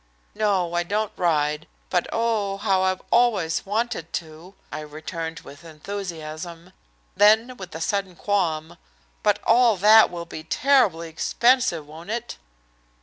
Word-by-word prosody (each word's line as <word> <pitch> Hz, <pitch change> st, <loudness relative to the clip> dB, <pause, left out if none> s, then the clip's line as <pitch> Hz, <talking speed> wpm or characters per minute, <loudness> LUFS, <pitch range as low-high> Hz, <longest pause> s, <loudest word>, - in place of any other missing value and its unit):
"No, 195 Hz, -5 st, 0 dB
I 175 Hz, -, +1 dB
don't 205 Hz, +4 st, -2 dB
ride, 150 Hz, -2 st, 0 dB, 0.2 s
but 180 Hz, -2 st, +1 dB
oh, 220 Hz, -4 st, 0 dB
how 195 Hz, -2 st, +1 dB
I've 185 Hz, 0 st, 0 dB
always 215 Hz, -9 st, +2 dB
wanted 215 Hz, -5 st, -2 dB
to!" 165 Hz, +4 st, -7 dB, 0.2 s
I 155 Hz, -, -5 dB
returned 160 Hz, +2 st, -6 dB
with 145 Hz, 0 st, -13 dB
enthusiasm. 170 Hz, 0 st, -7 dB, 0.4 s
Then, 220 Hz, +5 st, +4 dB
with 190 Hz, -5 st, -9 dB
a 160 Hz, -, -6 dB
sudden 195 Hz, 0 st, -2 dB
qualm, 165 Hz, -6 st, -1 dB, 0.4 s
"But -, -, +3 dB
all 235 Hz, -2 st, +4 dB
that 215 Hz, +4 st, +7 dB
will 170 Hz, -1 st, -6 dB
be 160 Hz, -1 st, -8 dB
terribly 205 Hz, -, +2 dB
expensive, 235 Hz, -, +1 dB
won't 160 Hz, +5 st, -12 dB
it?" 235 Hz, +2 st, -4 dB
180 Hz, 135 wpm, -24 LUFS, 165-215 Hz, 0.4 s, that